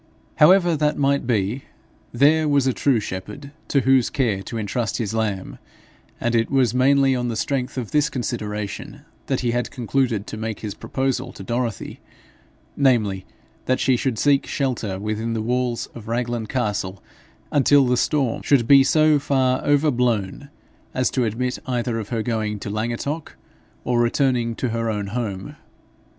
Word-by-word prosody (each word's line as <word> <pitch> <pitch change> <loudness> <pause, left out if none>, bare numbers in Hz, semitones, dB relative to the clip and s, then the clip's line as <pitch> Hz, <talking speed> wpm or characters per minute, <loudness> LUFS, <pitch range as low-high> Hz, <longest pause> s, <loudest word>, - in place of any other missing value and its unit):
However 175 +1 +5
that 150 0 0
might 140 -2 +1
be, 110 +2 -1 0.5
there 150 +5 +3
was 140 -2 +3
a 130 - +2
true 135 -3 +2
shepherd 105 +9 -7 0.2
to 140 - +2
whose 130 -1 +3
care 115 -8 0
to 115 - -6
entrust 110 0 -2
his 110 -2 -3
lamb; 100 - -2 0.6
and 120 - -1
it 115 -1 +2
was 130 -4 +2
mainly 135 +1 +4
on 125 -1 -1
the 115 - -2
strength 130 +2 -2
of 120 -4 -4
this 150 -1 +2
consideration 105 -4 -4 0.3
that 135 - 0
he 120 -2 0
had 120 +1 -1
concluded 120 -4 -1
to - - -7
make 110 -1 -4
his 105 -2 -4
proposal 135 -1 -2
to - - -9
Dorothy 120 0 -3 0.8
namely, 110 -9 +1 0.4
that 130 - +1
she 130 - +3
should 125 -1 -1
seek 140 +2 +2
shelter 115 -8 -2
within 110 +2 -2
the 115 - -2
walls 125 0 -1
of 110 -2 -10
Raglan 120 -1 -2
castle 105 -6 -2 0.5
until 145 -1 +4
the 125 0 +2
storm 135 -2 0
should 130 -5 +2
be 140 0 +8
so 155 +1 +4
far 130 -2 +1
over 145 +1 +3
blown, 120 +1 -1 0.5
as 130 -2 +1
to 125 -3 +1
admit 125 +3 -2
either 120 -2 -1
of 105 - -6
her 115 -3 -1
going 110 -3 -2
to 100 - -5
Llangattock 120 +8 -3 0.5
or 120 -1 +1
returning 120 -1 +1
to 125 - -2
her 115 0 -1
own 105 -2 -2
home. 100 -6 -4
120 Hz, 165 wpm, -22 LUFS, 110-135 Hz, 0.8 s, be